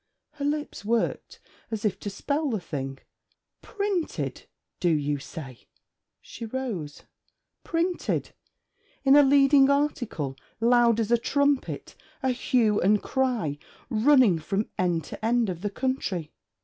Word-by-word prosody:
Her 295 Hz, -2 st, -5 dB
lips 295 Hz, -5 st, -2 dB
worked, 230 Hz, +2 st, -1 dB, 0.3 s
as 220 Hz, -1 st, -4 dB
if 205 Hz, -, 0 dB
to 205 Hz, -, -4 dB
spell 285 Hz, +9 st, -1 dB
the 220 Hz, -5 st, -1 dB
thing. 135 Hz, -5 st, -5 dB, 0.6 s
'Printed, 400 Hz, -5 st, -3 dB, 0.3 s
do 175 Hz, -, +2 dB
you 145 Hz, -2 st, 0 dB
say?' 135 Hz, -4 st, -10 dB, 0.5 s
she 235 Hz, -, -10 dB
rose. 215 Hz, -, -5 dB, 0.6 s
'Printed. 345 Hz, +1 st, -1 dB, 0.7 s
In 270 Hz, 0 st, +6 dB
a 290 Hz, -, +9 dB
leading 275 Hz, 0 st, +5 dB
article, 245 Hz, -, 0 dB, 0.2 s
loud 235 Hz, 0 st, +4 dB
as 225 Hz, 0 st, -1 dB
a 235 Hz, -, +4 dB
trumpet; 285 Hz, +2 st, 0 dB, 0.3 s
a 265 Hz, -, +2 dB
hue 240 Hz, -4 st, +2 dB
and 205 Hz, +2 st, +3 dB
cry 235 Hz, -, -1 dB, 0.3 s
running 235 Hz, -, +5 dB
from 195 Hz, +6 st, -2 dB
end 175 Hz, -3 st, 0 dB
to -, -, -10 dB
end 230 Hz, -1 st, +2 dB
of 175 Hz, -1 st, -7 dB
the 205 Hz, -, -1 dB
country. 200 Hz, -, -2 dB
235 Hz, 130 wpm, -26 LUFS, 180-275 Hz, 0.7 s, a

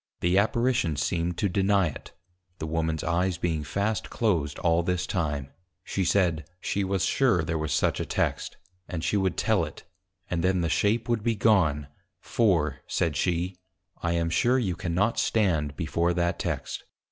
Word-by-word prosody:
The 90 Hz, +2 st, +3 dB
Apparition 115 Hz, -, +1 dB
seemed 85 Hz, +4 st, -1 dB
to 105 Hz, -, +1 dB
deny 100 Hz, +1 st, +2 dB
it; 75 Hz, -, -6 dB, 0.5 s
(the 80 Hz, -, -4 dB
Womans 80 Hz, 0 st, -1 dB
Eyes 90 Hz, +1 st, 0 dB
being 80 Hz, -3 st, -1 dB
fast 100 Hz, +7 st, -2 dB
closed 85 Hz, -11 st, 0 dB
all 85 Hz, 0 st, +2 dB
this 90 Hz, +1 st, -1 dB
time) 75 Hz, -6 st, -2 dB, 0.3 s
she 95 Hz, -, -2 dB
said, 85 Hz, -4 st, +1 dB
She 100 Hz, +2 st, -1 dB
was 95 Hz, -2 st, 0 dB
sure 125 Hz, -11 st, +2 dB
there 80 Hz, 0 st, -2 dB
was 75 Hz, -1 st, -2 dB
such -, -, +1 dB
a -, -, 0 dB
Text, -, -, -1 dB, 0.3 s
and 80 Hz, -3 st, -4 dB
she -, -, 0 dB
would 95 Hz, -3 st, +1 dB
tell -, -, +2 dB
it; -, -, -7 dB, 0.4 s
and 85 Hz, -1 st, -2 dB
then 95 Hz, -1 st, +2 dB
the 85 Hz, -, 0 dB
Shape 105 Hz, +7 st, +1 dB
would 120 Hz, -2 st, +1 dB
be 115 Hz, +1 st, 0 dB
gone, 85 Hz, -10 st, +3 dB, 0.3 s
for, 80 Hz, -, +1 dB
said 80 Hz, -3 st, 0 dB
she, 90 Hz, +4 st, -1 dB, 0.5 s
_I 85 Hz, 0 st, +1 dB
am 85 Hz, -1 st, 0 dB
sure 120 Hz, +10 st, +3 dB
you 100 Hz, -9 st, 0 dB
cannot 95 Hz, +5 st, 0 dB
stand 80 Hz, -10 st, +1 dB
before 85 Hz, +3 st, 0 dB
that 85 Hz, -1 st, 0 dB
Text! -, -, -3 dB
85 Hz, 170 wpm, -27 LUFS, 80-100 Hz, 0.5 s, The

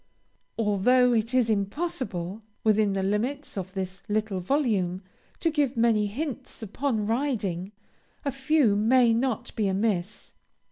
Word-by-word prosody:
Although 235 Hz, +4 st, +3 dB
it 230 Hz, 0 st, +1 dB
is 250 Hz, -3 st, +4 dB
impossible, 205 Hz, -, -2 dB, 0.2 s
within 215 Hz, -2 st, +3 dB
the 195 Hz, -1 st, -1 dB
limits 235 Hz, +9 st, -1 dB
of 190 Hz, -1 st, -5 dB
this 185 Hz, -1 st, -4 dB
little 210 Hz, -2 st, 0 dB
volume, 195 Hz, -5 st, 0 dB, 0.4 s
to 330 Hz, -, +2 dB
give 285 Hz, -5 st, 0 dB
many 225 Hz, -2 st, +3 dB
hints 265 Hz, +1 st, -5 dB
upon 220 Hz, +1 st, -1 dB
riding, 210 Hz, -7 st, -1 dB, 0.5 s
a 280 Hz, -, +1 dB
few 265 Hz, -4 st, +2 dB
may 230 Hz, +3 st, +4 dB
not 245 Hz, 0 st, -1 dB
be 215 Hz, -2 st, +1 dB
amiss. 195 Hz, 0 st, -1 dB
220 Hz, 130 wpm, -26 LUFS, 195-255 Hz, 0.5 s, is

